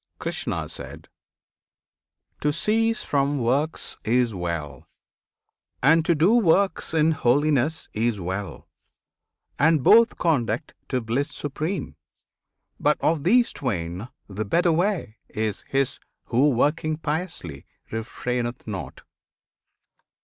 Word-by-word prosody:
Krishna. - - -3 1.7
To 150 - +1
cease 225 +7 +1
from 140 0 +1
works 135 +6 -1
Is 120 0 +2
well, 85 -7 -4 1.0
and 160 +4 +5
to 170 - +3
do 170 +8 +4
works 190 -6 +2
in 160 0 +4
holiness 145 +2 +1
Is 110 -1 0
well; 95 +2 -5 0.9
and 155 -1 +4
both 230 - +6
conduct 150 -2 0 0.2
to 130 -2 0
bliss 120 +6 -1
supreme; 155 +6 -4 0.8
But - - +2
of 160 -2 +2
these 235 - +3
twain 95 -3 -3 0.2
the 105 +1 -4
better 170 - +2
way 170 - 0
is 110 -2 -3
his 135 -1 0 0.2
Who 130 +5 +3
working 150 +4 +1
piously 155 - -4 0.2
refraineth 120 +2 -3
not. 95 - -6
140 Hz, 105 wpm, -24 LUFS, 115-160 Hz, 1.7 s, both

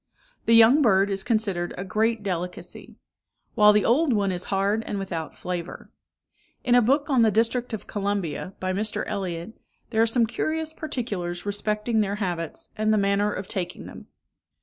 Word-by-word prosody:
The 230 - +6
young 230 +6 +7
bird 200 -5 +3
is 195 0 0
considered 195 -6 -1
a 185 - -3
great 220 +3 0
delicacy; 180 -2 -5 0.6
while 210 -2 +6
the 210 0 +2
old 275 +3 +3
one 200 -3 +1
is 180 0 -3
hard 200 +3 0
and 205 - -3
without 175 -5 -5
flavour. 175 -1 -6 0.7
In 245 - +2
a 245 - +7
book 275 +5 +2
on 260 -3 +4
the 225 - +5
District 230 +4 +1
of 220 - -5
Columbia, 195 -3 -3
by 185 0 -2
Mr. 210 +3 -1
Elliott, 180 +1 -4 0.4
there 220 -1 +2
are 230 - +4
some 230 +1 +3
curious 315 +7 -2
particulars 205 - -4
respecting 210 +2 0
their 200 -1 -1
habits, 175 -6 -3
and 215 -1 +1
the 215 - +3
manner 200 +1 +2
of 195 -1 -5
taking 180 -3 -4
them. - - -11
210 Hz, 170 wpm, -25 LUFS, 190-230 Hz, 0.7 s, young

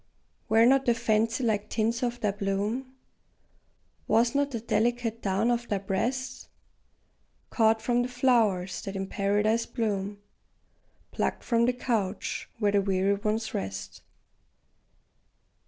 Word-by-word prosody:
Were 225 +1 +5
not 270 +1 +4
the 240 - +4
fancy 225 +1 +1
like 210 -2 0
tints 230 +1 0
of 240 -1 -2
thy 210 - +1
plume, 205 +6 -2 1.1
Was 230 +3 +3
not 285 0 +1
the 235 -4 -4
delicate 230 +1 0
down 200 +4 +1
of 240 0 -1
thy 205 - 0
breast, 245 +7 -3 1.0
Caught 220 -1 +3
from 245 0 +2
the 245 - -1
flowers 230 -8 +1
that 195 -1 -6
in 195 0 -2
Paradise 210 +4 +1
bloom, 205 -4 -2 0.9
Plucked - - -2
from 235 -1 +2
the 250 - +2
couch 220 -5 -2
where 210 -3 +2
the 200 0 +3
weary 195 0 +1
ones 215 +2 -2
rest? 95 0 -5
220 Hz, 130 wpm, -28 LUFS, 200-240 Hz, 1.1 s, Were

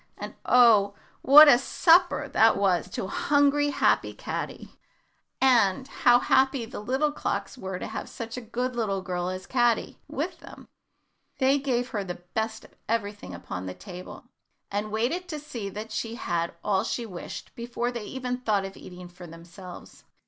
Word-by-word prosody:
And, - - -7
oh! 220 -5 +5 0.3
what 300 +3 +9
a 245 -4 +7
supper 330 +2 +3
that 225 -4 +4
was 185 -3 +1
to 185 - -4
hungry, 285 +6 +2
happy 285 - +2
little - - -11
Caddy! - - -5 0.7
and 245 -3 +3
how 245 0 +4
happy 265 0 +2
the 225 - -8
little 265 +8 0
clocks 295 - -3
were 190 -7 -5
to - - -6
have 220 - -6
such 230 -1 -7
a 250 - -5
good 245 +2 -3
little 200 -5 -1
girl 180 -1 -3
as 185 0 -6
Caddy 240 -2 0
with - - -4
them! - - -13 0.7
They 270 +1 +3
gave 250 -2 -1
her 210 -5 -3
the 175 -2 -7
best 220 0 -3
of - - -19 0.2
everything 205 - -3
upon 90 +1 -7
the 90 - -6
table, 185 -2 -10 0.5
and 205 +2 -2
waited 260 +12 -1
to 310 -4 -5
see 235 -9 -6
that 215 +3 -7
she 225 +2 -4
had 170 -6 -2
all 195 -1 +1
she 235 +1 -3
wished 180 -6 -8
before 240 +1 -3
they 235 -3 -6
even 250 +1 -4
thought 210 -5 0
of 195 - -8
eating 180 -1 -11
for 175 0 -12
themselves. 170 +2 -12
225 Hz, 170 wpm, -26 LUFS, 190-255 Hz, 0.7 s, what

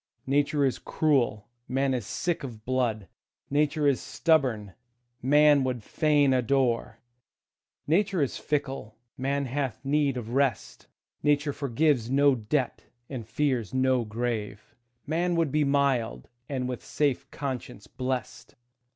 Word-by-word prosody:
Nature 145 +1 +2
is 130 - 0
cruel, 125 -9 +1 0.2
man 135 +1 +1
is 120 -5 -3
sick 175 -4 -2
of 115 -5 -8
blood; 120 -6 0 0.4
Nature 150 +1 +1
is 140 -3 +2
stubborn, 125 - +1 0.5
man 145 +1 +5
would 125 -4 -2
fain 145 +1 +2
adore; 125 -2 +1 0.9
Nature 190 +4 +2
is 140 -4 0
fickle, 135 -7 -3 0.2
man 140 +2 -1
hath 130 -1 -3
need 140 -2 +1
of 115 -2 -5
rest; 135 -2 -1 0.3
Nature 145 0 +2
forgives 140 -2 +1
no 140 +1 +4
debt, 125 +3 -1 0.3
and 120 -5 -5
fears 130 -4 -1
no 130 -1 +2
grave; 110 -2 -4 0.3
Man 170 +3 0
would 165 -4 +1
be 150 +1 +2
mild, 140 -5 +1 0.2
and 130 -3 -2
with 125 -2 -5
safe 145 -4 -1
conscience 130 -7 -5
blest. 130 +3 -5
135 Hz, 125 wpm, -27 LUFS, 120-145 Hz, 0.9 s, man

